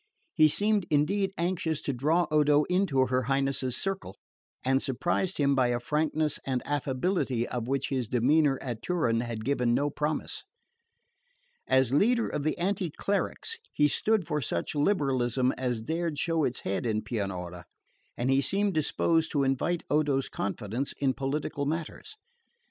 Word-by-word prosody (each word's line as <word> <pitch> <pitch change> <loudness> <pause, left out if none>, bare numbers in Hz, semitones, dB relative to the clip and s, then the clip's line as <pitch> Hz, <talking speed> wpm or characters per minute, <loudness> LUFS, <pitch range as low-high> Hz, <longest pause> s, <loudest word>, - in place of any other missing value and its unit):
He 155 -1 +6
seemed 205 +4 +1
indeed 190 +7 +2
anxious 170 -3 0
to 140 - -1
draw 155 +8 +2
Odo 150 -1 +4
into 175 -7 +2
her 130 0 +1
Highness's 135 -1 0
circle, 195 - -3 0.5
and 135 +1 +2
surprised 175 +7 -1
him 140 -1 +3
by 130 -2 +3
a 120 0 0
frankness 150 +3 0
and 130 -2 -2
affability 135 -2 -1
of 120 -2 -4
which 135 +1 -1
his 130 -4 -1
demeanour 135 +4 +3
at 120 -4 -4
Turin 150 -11 +1
had 115 -2 -4
given 125 -3 +1
no 145 +1 +1
promise. 150 +2 -3 1.2
As 130 -1 +3
leader 230 - +3
of - - -3
the 155 +2 -1
anti 185 0 -1
clericals 205 - -2 0.2
he 150 - +4
stood 210 +6 +1
for 150 0 -1
such 85 -8 -2
liberalism 135 - +1
as 125 -3 -2
dared 165 +3 -2
show 165 0 +1
its 125 - -2
head 95 +1 -2
in 110 -1 0
Pianura; 90 -5 -4 0.5
and 125 +2 0
he 135 +1 +4
seemed 200 +6 0
disposed 160 +1 +1
to 140 -2 +2
invite 135 +6 0
Odo's 145 -3 +1
confidence 105 +6 -3
in 135 -2 0
political 140 +1 -2
matters. 165 - -4
140 Hz, 155 wpm, -28 LUFS, 125-165 Hz, 1.2 s, He